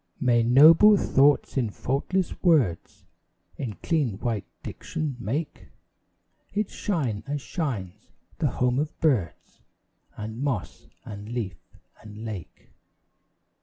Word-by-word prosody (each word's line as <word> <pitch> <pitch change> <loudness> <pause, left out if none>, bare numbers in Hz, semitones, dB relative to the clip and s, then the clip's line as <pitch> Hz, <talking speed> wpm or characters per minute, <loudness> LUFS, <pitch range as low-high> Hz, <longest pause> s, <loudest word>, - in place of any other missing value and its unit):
May 120 -2 +3
noble 155 - +7
thoughts 145 -3 +3
in 120 -4 +1
faultless 145 - -2
words 140 - +1 0.5
In 120 -6 -4
clean 140 - 0
white 115 -2 -3 0.2
diction 150 -4 -4
make 135 +9 -4 0.9
It 210 -1 -1
shine 135 - -2
as 145 +1 -2
shines 110 - -5 0.3
the 160 - +2
home 125 +1 0
of 150 +1 -3
birds 115 - -1 0.6
And 110 +3 -6
moss 135 -8 -3 0.2
and 105 +1 -8
leaf 110 -8 -4 0.4
and 105 +1 -10
lake. 105 -6 -8
125 Hz, 110 wpm, -26 LUFS, 105-150 Hz, 0.9 s, noble